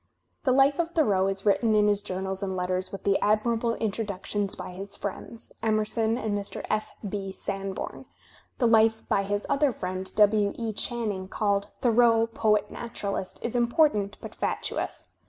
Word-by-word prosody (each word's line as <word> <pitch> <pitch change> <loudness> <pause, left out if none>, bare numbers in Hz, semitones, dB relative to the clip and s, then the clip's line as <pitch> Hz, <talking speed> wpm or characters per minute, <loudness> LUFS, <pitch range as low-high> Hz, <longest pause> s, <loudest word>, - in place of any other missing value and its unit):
The 260 - +4
life 275 +3 +4
of 335 -1 +1
Thoreau 210 - +2
is 195 +1 -3
written 215 +2 +3
in 210 0 +4
his 205 -1 +2
journals 190 -1 -4
and 190 -1 -2
letters 185 +1 -1
with 195 - -7
the 200 -1 +3
admirable 230 +2 +1
introductions 205 -2 -2
by - - -7
his 195 +2 -6
friends, 220 +3 -6
Emerson 220 +1 +1
and 220 -4 -1
Mr. 200 -1 -4
P. 215 0 -3
B. 195 -1 -4
Sanborn. 195 0 -5 0.5
The 250 - +1
life 225 0 +4
by 195 - +2
his 205 +1 -2
other 280 -1 +2
friend, 185 -3 -4
W. 210 -1 +4
E. 225 -2 -2
Channing, 210 -5 -1
called 200 0 0
"Thoreau: 230 -1 +5
Poet 215 -2 +1
Naturalist," 200 -5 -4
is 235 - -2
impor 245 +6 +4
tant 205 -1 -3
but - - -8
fatuous. - - -3
210 Hz, 165 wpm, -27 LUFS, 195-230 Hz, 0.5 s, Thoreau